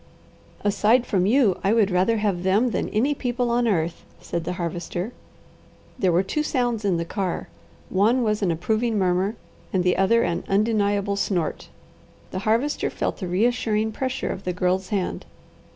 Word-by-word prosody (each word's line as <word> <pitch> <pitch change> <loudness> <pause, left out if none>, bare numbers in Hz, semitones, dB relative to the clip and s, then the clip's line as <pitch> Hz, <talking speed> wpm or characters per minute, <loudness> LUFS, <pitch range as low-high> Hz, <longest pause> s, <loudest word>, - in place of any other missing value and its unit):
"Aside 210 +4 +3
from 190 -4 +1
you, 225 -5 +3
I 200 - +3
would 215 -4 +3
rather 185 +6 +2
have 205 -4 0
them 205 +7 +2
than - - -1
any 250 +8 +1
people 245 -3 -1
on 240 0 +2
earth," 170 -5 -1 0.2
said 170 -1 -4
the 180 - -2
Harvester. 175 +4 -4 0.9
There 185 -5 +3
were 175 +3 +3
two 300 +10 -1
sounds 245 -7 -1
in 190 -4 +1
the 170 - -2
car; 185 0 -3 0.4
one 225 +7 +2
was 215 -1 0
an 195 - +1
approving 215 +7 0
murmur, 190 +2 +1 0.4
and 185 -2 +1
the 180 0 +2
other 230 +5 +3
an 170 -1 -1
undeniable 205 -1 +1
snort. 180 -5 -2 0.6
The - - -3
Harvester 255 +7 +1
felt - - -3
the 185 - -4
reassuring 220 +2 +1
pressure 260 +3 -3
of 190 - -5
the 180 - -2
Girl's 185 +1 0
hand. 195 -4 -2
205 Hz, 170 wpm, -24 LUFS, 185-230 Hz, 0.9 s, Aside